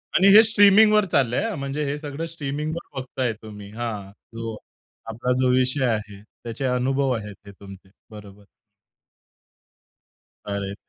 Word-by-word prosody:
आणि 190 - +5
हे 220 - +11
स्ट्रीमिंगवर 210 0 +5
चाललंय 130 - +1
हं, 215 - -4
म्हणजे 140 +2 -3
हे 140 +1 -2
सगळं 150 +1 -6
स्ट्रीमिंगवर 150 -1 -5
बघताय 130 -2 -3
तुम्ही 105 -2 -10
हां, 110 -4 -5 0.2
जो 115 -1 -5 0.5
आपला 115 +3 -2
जो 130 - +3
विषय 130 +1 +1
आहे, 105 -4 -3 0.2
त्याचे 120 +4 -5
अनुभव 130 +2 0
आहेत, 105 -2 -8
हे 100 - -9
तुमचे. 95 -1 -14 0.2
बरोबर. 105 -1 -13 2.0
अरे! 100 -1 -4
125 Hz, 130 wpm, -23 LUFS, 105-145 Hz, 2.0 s, हे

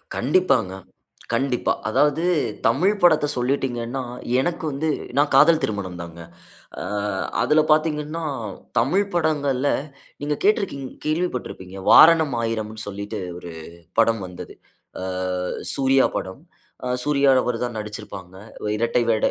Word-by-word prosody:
கண்டிப்பாங்க, 135 - +2 0.6
கண்டிப்பா. 135 -2 +1 0.2
அதாவது 145 +7 +2 0.5
தமிழ் 170 - +3
படத்த 160 -4 +5
சொல்லிட்டீங்கன்னா, 125 -1 -1 0.4
எனக்கு 170 +5 -1
வந்து 145 +3 -2 0.3
நான் 145 +1 +3
காதல் 160 +3 +6
திருமணம் 95 -4 -3
தாங்க. 85 0 -9 0.6
ஆ - - -3 0.6
அதில 150 +6 +4
பார்த்தீங்கன்னா, 155 +1 0 0.6
தமிழ் 175 - +2
படங்கள்ல, 145 -5 +1 0.5
நீங்க 145 +1 -1
கேட்ருக்கிங் 195 -10 +1 0.2
கேள்விப்பட்டிருப்பீங்க? 130 - -3
வாரணம் 160 -5 +7
ஆயிரம்னு 110 -1 -3
சொல்லிட்டு, 100 +2 -5 0.2
ஒரு 85 -1 -9 0.5
படம் 115 -1 +3
வந்தது. 90 -1 -10 0.5
ஆ - - -4 0.7
சூர்யா 135 -1 +3
படம். 95 +8 -6 0.4
அ - - -2 0.2
சூர்யா 140 -1 +3
அவரு 125 -1 -1
தான் 120 -1 -6
நடுச்சுருப்பாங்க. 95 -3 -8 0.3
அ - - -1
இரட்டை 115 +2 +1
வேட 110 -1 +2
135 Hz, 115 wpm, -23 LUFS, 110-155 Hz, 0.7 s, வாரணம்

